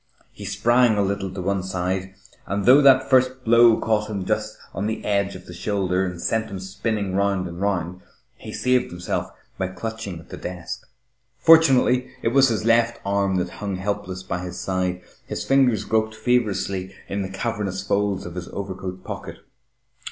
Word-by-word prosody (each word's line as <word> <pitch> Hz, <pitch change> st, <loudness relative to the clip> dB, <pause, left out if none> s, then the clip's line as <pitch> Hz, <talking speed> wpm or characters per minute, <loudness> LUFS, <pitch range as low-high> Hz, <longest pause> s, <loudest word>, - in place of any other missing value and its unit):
He -, -, -10 dB
sprang 120 Hz, +2 st, +3 dB
a 100 Hz, -, +3 dB
little 100 Hz, 0 st, -1 dB
on 90 Hz, -, -3 dB
one 100 Hz, 0 st, 0 dB
side, 95 Hz, +1 st, -3 dB, 0.3 s
and 100 Hz, 0 st, -2 dB
though 130 Hz, +4 st, +8 dB
that 135 Hz, -2 st, +6 dB
first 130 Hz, 0 st, +3 dB
blow 115 Hz, 0 st, +6 dB
caught 105 Hz, -1 st, 0 dB
him 100 Hz, -3 st, -3 dB
just -, -, -2 dB, 0.2 s
on 100 Hz, +2 st, -2 dB
the 110 Hz, -, -4 dB
edge 100 Hz, -1 st, 0 dB
of 90 Hz, -, -11 dB
the 90 Hz, -, -10 dB
shoulder 95 Hz, -1 st, 0 dB
and 90 Hz, -1 st, -6 dB
sent 110 Hz, +5 st, 0 dB
him 100 Hz, -2 st, -6 dB
spinning 100 Hz, +1 st, -3 dB
round 100 Hz, -1 st, +1 dB
and 85 Hz, +1 st, -8 dB
round, 90 Hz, -3 st, -1 dB, 0.3 s
he -, -, -10 dB
saved 125 Hz, 0 st, +1 dB
himself 90 Hz, +1 st, -3 dB, 0.3 s
by 95 Hz, -, 0 dB
clutching 100 Hz, -1 st, -6 dB
at 80 Hz, -, -16 dB
the -, -, -7 dB
desk. 90 Hz, -1 st, -7 dB, 0.5 s
Fortunately, 135 Hz, -6 st, +5 dB
it -, -, +3 dB
was 135 Hz, +2 st, +5 dB
his 110 Hz, -1 st, -1 dB
left 115 Hz, 0 st, +3 dB
arm 100 Hz, -1 st, +1 dB
that 90 Hz, -1 st, -1 dB
hung 100 Hz, -2 st, -2 dB
helpless 95 Hz, -1 st, -3 dB
by 95 Hz, -1 st, -3 dB
his 90 Hz, 0 st, -6 dB
side. 90 Hz, -1 st, -2 dB, 0.2 s
His -, -, -4 dB
fingers 130 Hz, -6 st, +3 dB
groped 110 Hz, 0 st, 0 dB
feverishly 105 Hz, -5 st, 0 dB
in 100 Hz, +1 st, -2 dB
the 95 Hz, -, -4 dB
cavernous 95 Hz, -2 st, -3 dB
folds 100 Hz, -1 st, 0 dB
of 85 Hz, -, -7 dB
his 90 Hz, 0 st, -6 dB
overcoat 95 Hz, -1 st, -6 dB
pocket. -, -, -7 dB
100 Hz, 180 wpm, -23 LUFS, 95-115 Hz, 0.5 s, though